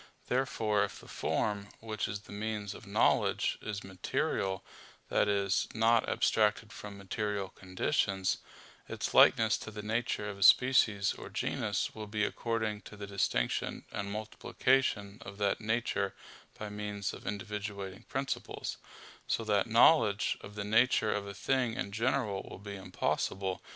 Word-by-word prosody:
Therefore 110 Hz, -5 st, +1 dB
if 100 Hz, -, -4 dB
the -, -, -14 dB
form, 100 Hz, -1 st, -1 dB
which 110 Hz, -1 st, -3 dB
is 100 Hz, 0 st, -4 dB
the -, -, -15 dB
means 105 Hz, -1 st, -3 dB
of -, -, -12 dB
knowledge, -, -, +2 dB
is 100 Hz, -1 st, -4 dB
material 95 Hz, 0 st, -2 dB, 0.4 s
that -, -, +3 dB
is, 100 Hz, -2 st, +1 dB
not 115 Hz, +1 st, +4 dB
abstracted 110 Hz, +1 st, +2 dB
from 105 Hz, -1 st, -8 dB
material 100 Hz, 0 st, -2 dB
conditions 95 Hz, 0 st, 0 dB, 0.5 s
its -, -, -3 dB
likeness 110 Hz, -1 st, +6 dB
to -, -, -7 dB
the 105 Hz, -1 st, -7 dB
nature 110 Hz, -1 st, -1 dB
of 100 Hz, -1 st, -6 dB
a -, -, -12 dB
species 105 Hz, -3 st, +5 dB
or -, -, -9 dB
genus -, -, -1 dB
will 110 Hz, -1 st, -7 dB
be 105 Hz, 0 st, -1 dB
according 110 Hz, -3 st, -2 dB
to 105 Hz, -, -12 dB
the 100 Hz, -, -6 dB
distinction 100 Hz, -11 st, -1 dB
and 100 Hz, 0 st, -3 dB
multiplication 110 Hz, 0 st, 0 dB
of 100 Hz, -1 st, -9 dB
that 100 Hz, 0 st, +1 dB
nature 110 Hz, -3 st, 0 dB, 0.4 s
by 105 Hz, -, -5 dB
means 105 Hz, 0 st, -4 dB
of -, -, -10 dB
individuating 105 Hz, -2 st, -5 dB
principles; 135 Hz, 0 st, -3 dB, 0.5 s
so 115 Hz, -, 0 dB
that 105 Hz, -1 st, +2 dB
knowledge 115 Hz, -2 st, +5 dB
of 105 Hz, -, -10 dB
the 100 Hz, -1 st, -3 dB
nature 110 Hz, 0 st, +3 dB
of 100 Hz, -1 st, -3 dB
a 100 Hz, -, -7 dB
thing 125 Hz, 0 st, 0 dB
in 130 Hz, -6 st, -3 dB
general 110 Hz, -2 st, 0 dB
will -, -, -8 dB
be 100 Hz, +1 st, -7 dB
impossible. 95 Hz, 0 st, -2 dB
105 Hz, 150 wpm, -32 LUFS, 100-110 Hz, 0.5 s, likeness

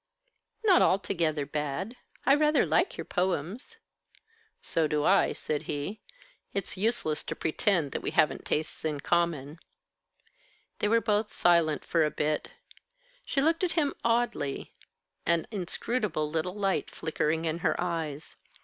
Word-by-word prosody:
"Not 390 Hz, -5 st, +6 dB
altogether 170 Hz, -6 st, +1 dB
bad. 150 Hz, -, -3 dB, 0.3 s
I 275 Hz, -, +6 dB
rather 300 Hz, +1 st, +4 dB
like -, -, +1 dB
your -, -, -5 dB
poems." 185 Hz, -, -2 dB, 0.9 s
"So 160 Hz, -2 st, +1 dB
do 150 Hz, -1 st, 0 dB
I," 195 Hz, +4 st, +4 dB
said 150 Hz, -1 st, -2 dB
he. 150 Hz, +9 st, -3 dB, 0.5 s
"It's 195 Hz, -2 st, -2 dB
useless 195 Hz, -7 st, 0 dB
to -, -, -4 dB
pretend 160 Hz, -2 st, +1 dB
that -, -, -3 dB
we -, -, -2 dB
haven't 155 Hz, -1 st, +2 dB
tastes 155 Hz, +1 st, -2 dB
in 150 Hz, -3 st, -2 dB
common." 165 Hz, -3 st, 0 dB, 1.2 s
They -, -, +1 dB
were 230 Hz, +2 st, +4 dB
both 210 Hz, -1 st, +1 dB
silent 170 Hz, -3 st, +3 dB
for 165 Hz, -2 st, +2 dB
a 150 Hz, -, +2 dB
bit. 150 Hz, 0 st, -1 dB, 0.8 s
She 275 Hz, -, +1 dB
looked 325 Hz, +3 st, +2 dB
at 360 Hz, -, +1 dB
him 295 Hz, -4 st, +1 dB
oddly, 230 Hz, -12 st, 0 dB, 0.5 s
an 170 Hz, -1 st, +2 dB
inscrutable 195 Hz, -3 st, -1 dB
little 165 Hz, +4 st, -1 dB
light 195 Hz, -2 st, 0 dB
flickering 160 Hz, 0 st, -1 dB
in 160 Hz, +1 st, -1 dB
her -, -, 0 dB
eyes. 160 Hz, -4 st, -3 dB
170 Hz, 140 wpm, -29 LUFS, 155-210 Hz, 1.2 s, Not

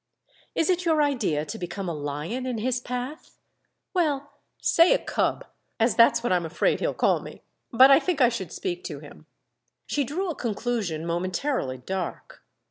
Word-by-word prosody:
"Is 330 Hz, +2 st, +2 dB
it 360 Hz, 0 st, 0 dB
your 320 Hz, -3 st, +3 dB
idea 215 Hz, -, 0 dB
to 145 Hz, -, -6 dB
become 180 Hz, +2 st, -5 dB
a 170 Hz, -, -2 dB
lion 150 Hz, -, -4 dB
in 250 Hz, -2 st, -2 dB
his 250 Hz, +3 st, 0 dB
path?" 250 Hz, +5 st, -6 dB, 0.6 s
"Well, 290 Hz, -6 st, 0 dB, 0.3 s
say 335 Hz, +9 st, +5 dB
a -, -, +3 dB
cub—as 230 Hz, -, -2 dB
that's 235 Hz, 0 st, +5 dB
what 240 Hz, -, 0 dB
I'm 175 Hz, -1 st, +1 dB
afraid 160 Hz, -, 0 dB
he'll -, -, -1 dB
call -, -, +2 dB
me! -, -, -11 dB, 0.3 s
But 260 Hz, +2 st, +7 dB
I 275 Hz, -, +8 dB
think 350 Hz, -3 st, -1 dB
I 245 Hz, -3 st, +6 dB
should 190 Hz, -8 st, -5 dB
speak 360 Hz, -1 st, -4 dB
to -, -, -5 dB
him." -, -, -14 dB, 0.6 s
She 290 Hz, -, 0 dB
drew 340 Hz, +7 st, -2 dB
a -, -, -6 dB
conclusion 215 Hz, -9 st, -2 dB
momentarily 175 Hz, -, -1 dB
dark. 180 Hz, +7 st, -6 dB
245 Hz, 170 wpm, -26 LUFS, 180-290 Hz, 0.6 s, I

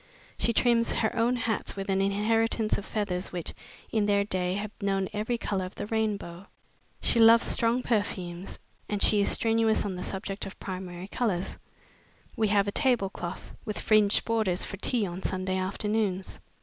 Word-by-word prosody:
She -, -, +2 dB
trims 235 Hz, 0 st, +3 dB
her 220 Hz, -, 0 dB
own 235 Hz, +2 st, +2 dB
hats 230 Hz, -3 st, -2 dB
with 195 Hz, -1 st, -4 dB
an 195 Hz, -1 st, +1 dB
inheritance 215 Hz, +2 st, +1 dB
of 205 Hz, -, -5 dB
feathers 190 Hz, -4 st, -2 dB
which, 175 Hz, -2 st, -5 dB, 0.4 s
in 215 Hz, -2 st, +1 dB
their 200 Hz, -1 st, +3 dB
day 185 Hz, -2 st, 0 dB
have 205 Hz, +1 st, -4 dB
known 195 Hz, -1 st, 0 dB
every 215 Hz, +3 st, -1 dB
color 195 Hz, -4 st, -2 dB
of 185 Hz, +2 st, -7 dB
the 205 Hz, -, -4 dB
rainbow. 205 Hz, -5 st, -2 dB, 0.5 s
She 235 Hz, -, +2 dB
loves 230 Hz, +1 st, +7 dB
strong 235 Hz, +2 st, +2 dB
perfumes, 190 Hz, -5 st, -2 dB, 0.3 s
and 205 Hz, -, -1 dB
she 210 Hz, -1 st, +5 dB
is -, -, +2 dB
strenuous 225 Hz, -1 st, +2 dB
on 200 Hz, -, -2 dB
the 180 Hz, -, -6 dB
subject 195 Hz, +1 st, -4 dB
of 195 Hz, -, -8 dB
the -, -, -13 dB
primary 185 Hz, -1 st, -5 dB
colors. 200 Hz, -5 st, -2 dB, 0.8 s
We 220 Hz, -, +2 dB
have 200 Hz, -1 st, +3 dB
a -, -, 0 dB
table 240 Hz, -6 st, +1 dB
cloth 175 Hz, +1 st, -7 dB
with 210 Hz, -, -4 dB
fringed 215 Hz, -2 st, +4 dB
borders 215 Hz, -6 st, +1 dB
for 200 Hz, -, -6 dB
tea 225 Hz, +2 st, +1 dB
on 180 Hz, 0 st, -5 dB
Sunday 185 Hz, 0 st, -1 dB
afternoons. 195 Hz, 0 st, -1 dB
205 Hz, 175 wpm, -28 LUFS, 190-225 Hz, 0.8 s, loves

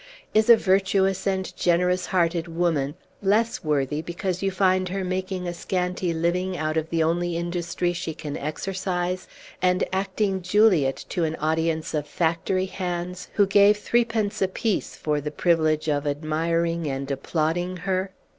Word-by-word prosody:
Is 215 Hz, +2 st, +3 dB
a 235 Hz, -, +10 dB
virtuous 190 Hz, 0 st, +2 dB
and 190 Hz, -1 st, -1 dB
generous 180 Hz, +1 st, +2 dB
hearted 170 Hz, -2 st, +1 dB
woman 165 Hz, -4 st, 0 dB, 0.3 s
less 215 Hz, +4 st, +1 dB
worthy 150 Hz, -1 st, 0 dB
because 175 Hz, +2 st, -3 dB
you 195 Hz, -, +1 dB
find 185 Hz, -1 st, +2 dB
her 195 Hz, +1 st, -2 dB
making 185 Hz, 0 st, -3 dB
a 175 Hz, -, -2 dB
scanty 180 Hz, 0 st, -2 dB
living 175 Hz, +3 st, 0 dB
out 155 Hz, +1 st, -1 dB
of 160 Hz, 0 st, -1 dB
the 165 Hz, -1 st, +1 dB
only 170 Hz, +1 st, 0 dB
industry 175 Hz, 0 st, -1 dB
she 165 Hz, -2 st, -4 dB
can 145 Hz, -2 st, -6 dB
exercise, 180 Hz, +3 st, -3 dB, 0.3 s
and 180 Hz, 0 st, +2 dB
acting 195 Hz, 0 st, 0 dB
Juliet 180 Hz, -7 st, +3 dB
to 175 Hz, -, -1 dB
an 160 Hz, 0 st, 0 dB
audience 160 Hz, +1 st, -1 dB
of 150 Hz, -1 st, -1 dB
factory 175 Hz, +2 st, 0 dB
hands, 180 Hz, -1 st, -4 dB
who 205 Hz, -, +4 dB
gave 200 Hz, +1 st, +5 dB
threepence 230 Hz, -1 st, 0 dB
apiece 190 Hz, +2 st, -1 dB
for 150 Hz, -1 st, -1 dB
the 150 Hz, -, -3 dB
privilege 155 Hz, -1 st, +1 dB
of 145 Hz, -1 st, 0 dB
admiring 165 Hz, +3 st, 0 dB
and 135 Hz, 0 st, -3 dB
applauding 165 Hz, +6 st, -1 dB
her? 190 Hz, 0 st, 0 dB
175 Hz, 150 wpm, -25 LUFS, 160-190 Hz, 0.3 s, a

